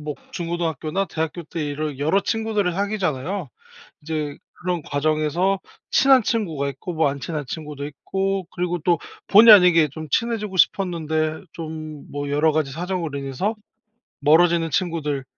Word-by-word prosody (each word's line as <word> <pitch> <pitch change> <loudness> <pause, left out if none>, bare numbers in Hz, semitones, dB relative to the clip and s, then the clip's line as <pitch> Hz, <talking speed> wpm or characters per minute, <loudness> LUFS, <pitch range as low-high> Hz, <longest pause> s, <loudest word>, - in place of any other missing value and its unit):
뭐 150 0 -4 0.2
중고등학교나 170 +1 -2
대학교 160 +1 -3
때 165 0 -5
이런 145 -1 -3
여러 155 +8 +2
친구들을 215 -4 0
사귀잖아요. 190 -4 -2 0.5
이제 150 -2 -3 0.3
그런 180 -2 -1
과정에서 155 +7 0 0.3
친한 265 -2 +5
친구가 165 - -1
있고 140 +6 -7
뭐 160 -2 +3
안 140 0 -4
친한 150 0 -4
친구도 150 -1 -6
있고 190 +6 -2
그리고 175 0 -1
또 175 -1 +3 0.3
본의 215 +2 +10
아니게 175 -5 +6
좀 155 +1 -8
친해지고 215 -3 -1
싶었는데 160 -4 +1
좀 155 -2 -7
뭐 145 0 -4
여러 150 +2 +3
가지 155 -3 0
사정으로 170 -2 -3
인해서 140 - -2 0.7
멀어지는 165 +2 +4
친구들, 155 -7 -1
160 Hz, 335 characters per minute, -22 LUFS, 150-185 Hz, 0.7 s, 본의